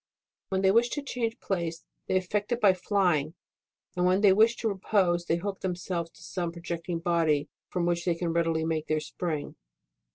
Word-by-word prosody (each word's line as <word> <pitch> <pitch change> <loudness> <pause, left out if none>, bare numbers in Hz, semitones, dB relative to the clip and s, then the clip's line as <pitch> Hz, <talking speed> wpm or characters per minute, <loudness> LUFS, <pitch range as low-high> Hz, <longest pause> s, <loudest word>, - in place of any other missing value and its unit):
When 190 0 0
they 190 - +5
wish, 235 +3 +4
to 290 - -2
change 240 -3 -3
place, 170 -3 -3 0.2
they 185 - +2
effect 205 +4 -2
it 240 - +1
by 200 -5 +6
flying, 175 -5 +1 0.6
and 180 - 0
when 185 +2 +3
they 200 -3 +7
wish 220 +4 +5
to 230 - -2
repose, 190 -4 +1
they 165 - +2
hook 195 +3 -4
themselves 175 -2 -3
to - - -16
some 175 -2 -3
projecting 170 0 -4
body 165 -4 +1 0.2
from 180 -2 -1
which 175 0 0
they 175 -2 +2
can 170 -1 -2
readily 165 -1 +1
make 160 -1 -1
their 155 0 +1
spring. 155 -1 -4
175 Hz, 190 wpm, -28 LUFS, 165-195 Hz, 0.6 s, they